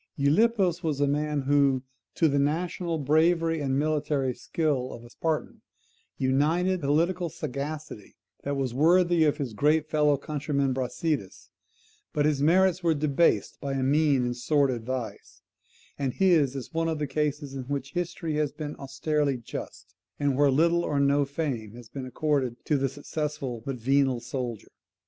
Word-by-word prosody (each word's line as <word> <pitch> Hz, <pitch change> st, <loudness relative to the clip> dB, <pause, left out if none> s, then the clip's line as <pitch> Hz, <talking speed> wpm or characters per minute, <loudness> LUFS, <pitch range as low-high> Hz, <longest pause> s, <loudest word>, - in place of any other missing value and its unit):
Gylippus 180 Hz, +4 st, +2 dB
was 155 Hz, -5 st, -1 dB
a 145 Hz, -, +3 dB
man 150 Hz, +1 st, 0 dB
who, 135 Hz, -1 st, +2 dB, 0.3 s
to 165 Hz, -, +3 dB
the 140 Hz, -1 st, +1 dB
national 165 Hz, +3 st, -1 dB
bravery 165 Hz, +3 st, +2 dB
and 135 Hz, -1 st, 0 dB
military 145 Hz, -3 st, 0 dB
skill 140 Hz, -3 st, -1 dB
of 120 Hz, -, -10 dB
a 120 Hz, -, -14 dB
Spartan, 160 Hz, +2 st, -3 dB, 0.6 s
united 160 Hz, +8 st, +1 dB
political 170 Hz, +5 st, +1 dB
sagacity 140 Hz, -5 st, -6 dB, 0.3 s
that 140 Hz, 0 st, -2 dB
was 130 Hz, -3 st, -1 dB
worthy 170 Hz, +3 st, +4 dB
of 150 Hz, -, +2 dB
his 130 Hz, -6 st, -4 dB
great 150 Hz, +6 st, +2 dB
fellow 150 Hz, -2 st, +3 dB
countryman 140 Hz, -1 st, -1 dB
Brasidas; 130 Hz, -, -3 dB, 0.6 s
but 145 Hz, -1 st, +1 dB
his 150 Hz, -2 st, +1 dB
merits 185 Hz, +3 st, +4 dB
were 165 Hz, -2 st, +2 dB
debased 150 Hz, +2 st, +1 dB
by 140 Hz, -1 st, -2 dB
mean 145 Hz, -1 st, +3 dB
and 120 Hz, 0 st, -1 dB
sordid 130 Hz, -2 st, +1 dB
vice; 130 Hz, -3 st, -6 dB, 0.6 s
and 135 Hz, -3 st, -1 dB
his 160 Hz, -8 st, +3 dB
is 135 Hz, +2 st, -7 dB
one 165 Hz, 0 st, 0 dB
of 160 Hz, -, -1 dB
the 150 Hz, -, -1 dB
cases 145 Hz, 0 st, -2 dB
in 135 Hz, -2 st, -5 dB
which 140 Hz, 0 st, -4 dB
history 170 Hz, -3 st, -2 dB
has 150 Hz, -2 st, 0 dB
been 150 Hz, -2 st, -6 dB
austerely 140 Hz, +1 st, -1 dB
just, 120 Hz, -, -8 dB, 0.3 s
and 140 Hz, -2 st, +1 dB
where 145 Hz, +1 st, +4 dB
little 170 Hz, +5 st, +3 dB
or 145 Hz, -4 st, 0 dB
no 140 Hz, 0 st, +3 dB
fame 135 Hz, -7 st, -3 dB
has 120 Hz, -2 st, -12 dB
been 130 Hz, 0 st, -6 dB
accorded 135 Hz, -3 st, 0 dB
to 150 Hz, -, +2 dB
the 135 Hz, -1 st, +1 dB
successful 145 Hz, -3 st, -4 dB
but 135 Hz, -, -2 dB
venal 135 Hz, +1 st, +2 dB
soldier. 120 Hz, -2 st, -5 dB
145 Hz, 160 wpm, -27 LUFS, 135-155 Hz, 0.6 s, worthy